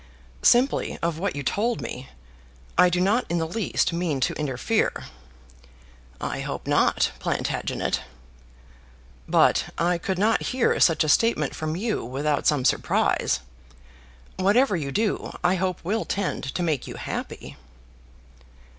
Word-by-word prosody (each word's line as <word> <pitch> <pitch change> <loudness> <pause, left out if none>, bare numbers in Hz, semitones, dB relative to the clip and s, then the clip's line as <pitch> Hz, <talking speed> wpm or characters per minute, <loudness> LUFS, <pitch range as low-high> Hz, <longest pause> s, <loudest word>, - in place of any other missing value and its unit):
"Simply 250 +3 +3
of 165 -1 -1
what 200 -2 -2
you 140 - -4
told 225 - 0
me. 125 +1 -7 0.7
I 180 +1 +6
do 175 0 0
not 205 +7 +2
in 170 - 0
the 165 - 0
least 180 0 -1
mean 170 -5 -1
to - - +1
interfere." 150 - -1 1.2
"I - - -3
hope - - -5
not, - - +2
Plantagenet." - - -2 1.3
"But - - +4
I 175 +1 +1
could 190 +2 -2
not 215 +4 +2 0.2
hear 250 - +2
such 165 -3 +4
a - - -2
statement 230 +10 +2
from 155 0 -3
you 215 +4 -2
without 140 +4 -1
some 145 -4 +2
surprise. 65 - +1 1.0
Whatever 205 +4 +3
you 145 -5 -3
do 215 +5 -1
I 180 - +4
hope 185 -1 -1
will 215 +5 0
tend 200 -6 -2
to 180 - -1
make 155 -6 -1
you - - -7
happy." - - -6
175 Hz, 135 wpm, -25 LUFS, 155-205 Hz, 1.3 s, I